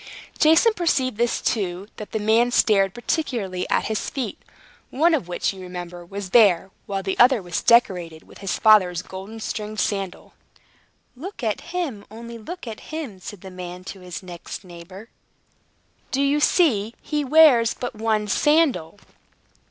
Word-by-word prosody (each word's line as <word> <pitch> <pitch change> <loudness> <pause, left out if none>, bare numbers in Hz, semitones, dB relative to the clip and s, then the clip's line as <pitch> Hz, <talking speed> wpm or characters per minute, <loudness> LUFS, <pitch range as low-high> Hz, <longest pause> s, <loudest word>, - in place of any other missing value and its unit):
Jason 325 +9 +5
perceived, 265 - 0 0.2
too, 190 -3 -1
that 210 - -8
the - - -1
man 220 +3 +3
stared 200 -5 +3
particularly 230 - -3
at - - +1
his 220 -1 -2
feet, 255 -7 -5 0.5
one 325 +6 +3
of 275 - 0
which, 180 +2 -1
you 190 - -11
remember, 175 -1 -7
was 195 +2 -7
bare, 195 -5 +5 0.2
while 195 -1 -3
the 190 0 -3
other 250 0 +6
was 175 -3 -3
decorated 180 -9 +2
with - - -16
his 195 -2 -2
father's 185 -5 +4
golden 195 +4 -9
stringed 215 -1 -5
sandal. 195 -3 -3 0.8
"Look 335 +3 -8
at 215 -3 -1
him! 335 - -4
only 230 +2 -9
look 350 +10 -8
at 225 -2 -9
him!" 290 -12 -6
said 190 0 -9
the 190 - -10
man 180 0 -8
to 195 - -15
his 180 -2 -8
next 175 0 -8
neighbor. 185 +4 -12 1.0
"Do 275 +1 0
you 280 +1 +2
see? 235 - +2
He 300 -1 -2
wears 270 -5 +5
but 245 - -5
one 215 -1 -1
sandal!" 280 - +2
215 Hz, 155 wpm, -23 LUFS, 185-255 Hz, 1.0 s, other